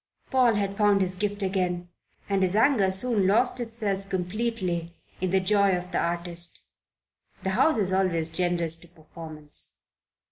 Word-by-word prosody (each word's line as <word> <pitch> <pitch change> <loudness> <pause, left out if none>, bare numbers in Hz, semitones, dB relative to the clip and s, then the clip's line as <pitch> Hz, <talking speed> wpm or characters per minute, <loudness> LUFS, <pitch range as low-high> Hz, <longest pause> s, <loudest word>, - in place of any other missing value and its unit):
Paul 250 -4 +4
had 200 -1 -1
found 205 -2 +4
his 185 -1 0
gift 205 +2 -2
again, 180 -2 -1 0.4
and 195 -1 +1
his 185 +1 +1
anger 220 -5 +4
soon 200 0 +2
lost 250 +6 +3
itself 210 -4 -3
completely 185 -3 -2 0.3
in 185 - 0
the 190 +1 +3
joy 195 0 +3
of 180 +1 -7
the - - 0
artist. 170 0 -3 0.8
The 190 - 0
House 260 +8 +3
is 190 -3 0
always 170 -4 +1
generous 170 -1 +1
to 170 - -15
performance. 155 -2 -8
190 Hz, 150 wpm, -26 LUFS, 175-205 Hz, 0.8 s, Paul